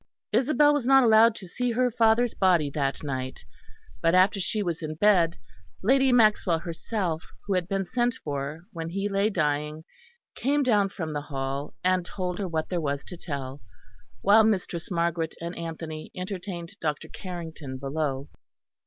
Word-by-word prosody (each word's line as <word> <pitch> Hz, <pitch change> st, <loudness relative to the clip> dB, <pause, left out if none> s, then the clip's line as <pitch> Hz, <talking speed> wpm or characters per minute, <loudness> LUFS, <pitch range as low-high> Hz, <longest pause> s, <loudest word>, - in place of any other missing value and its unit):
Isabel 290 Hz, +5 st, +4 dB
was 280 Hz, -4 st, -1 dB
not 270 Hz, 0 st, +7 dB
allowed 225 Hz, 0 st, +6 dB
to 190 Hz, -, -9 dB
see 245 Hz, +6 st, -1 dB
her 250 Hz, +1 st, +2 dB
father's 225 Hz, +1 st, +3 dB
body 175 Hz, -7 st, +3 dB
that 140 Hz, 0 st, -2 dB
night, 130 Hz, -2 st, -4 dB, 0.6 s
but 165 Hz, +2 st, +3 dB
after 190 Hz, +2 st, +4 dB
she 205 Hz, +3 st, -1 dB
was 170 Hz, -3 st, -3 dB
in 155 Hz, -1 st, -4 dB
bed, 175 Hz, -2 st, +3 dB, 0.5 s
Lady 265 Hz, +4 st, +4 dB
Maxwell 215 Hz, -7 st, +4 dB
herself, 170 Hz, 0 st, -3 dB, 0.2 s
who 200 Hz, -, -1 dB
had 180 Hz, -2 st, 0 dB
been 195 Hz, 0 st, -1 dB
sent 240 Hz, +3 st, 0 dB
for 145 Hz, +2 st, -4 dB
when 165 Hz, -1 st, -4 dB
he 195 Hz, +3 st, -2 dB
lay 200 Hz, +1 st, +1 dB
dying, 150 Hz, -3 st, -1 dB, 0.5 s
came 285 Hz, +4 st, +1 dB
down 210 Hz, -6 st, +3 dB
from 160 Hz, -5 st, -5 dB
the 145 Hz, -, -2 dB
Hall, 140 Hz, 0 st, -4 dB
and 185 Hz, 0 st, +2 dB
told 180 Hz, 0 st, -4 dB
her 195 Hz, -, -1 dB
what 160 Hz, -2 st, -2 dB
there 175 Hz, -2 st, -1 dB
was 140 Hz, -2 st, -2 dB
to 180 Hz, -, -7 dB
tell; 140 Hz, -5 st, -6 dB, 0.6 s
while 210 Hz, +3 st, +6 dB
Mistress 185 Hz, -5 st, -1 dB
Margaret 170 Hz, -2 st, -1 dB
and 170 Hz, +1 st, -5 dB
Anthony 160 Hz, -1 st, -6 dB
entertained 185 Hz, 0 st, -6 dB
Dr. 150 Hz, -3 st, -2 dB
Carrington 160 Hz, -7 st, -7 dB
below. 140 Hz, 0 st, -2 dB
175 Hz, 160 wpm, -27 LUFS, 155-210 Hz, 0.6 s, not